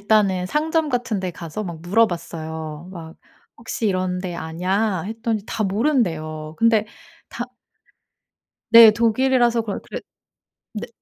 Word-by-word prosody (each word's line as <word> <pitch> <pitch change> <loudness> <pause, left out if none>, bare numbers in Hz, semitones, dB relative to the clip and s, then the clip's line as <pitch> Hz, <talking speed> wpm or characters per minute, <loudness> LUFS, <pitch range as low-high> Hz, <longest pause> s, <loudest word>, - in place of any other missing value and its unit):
일단은 200 -3 +2
상점 315 - 0
같은 245 -6 -1
데 185 -1 -2
가서 170 +4 -6
막 170 -4 -6
물어봤어요. 165 -5 -1
막 165 -3 -9 0.4
'혹시 230 0 -3
이런데 185 -2 -1
아냐.' 180 +4 -1
했더니 225 -1 -2
다 220 - -2
모른대요. 175 - -1
근데 225 -2 +3 0.4
다 240 - -5 1.3
네 230 -1 +10
독일이라서 235 +2 +2
그러 210 -3 -4
그래 - - -7 0.7
네. 215 +2 -5
205 Hz, 250 characters per minute, -22 LUFS, 170-230 Hz, 1.3 s, 네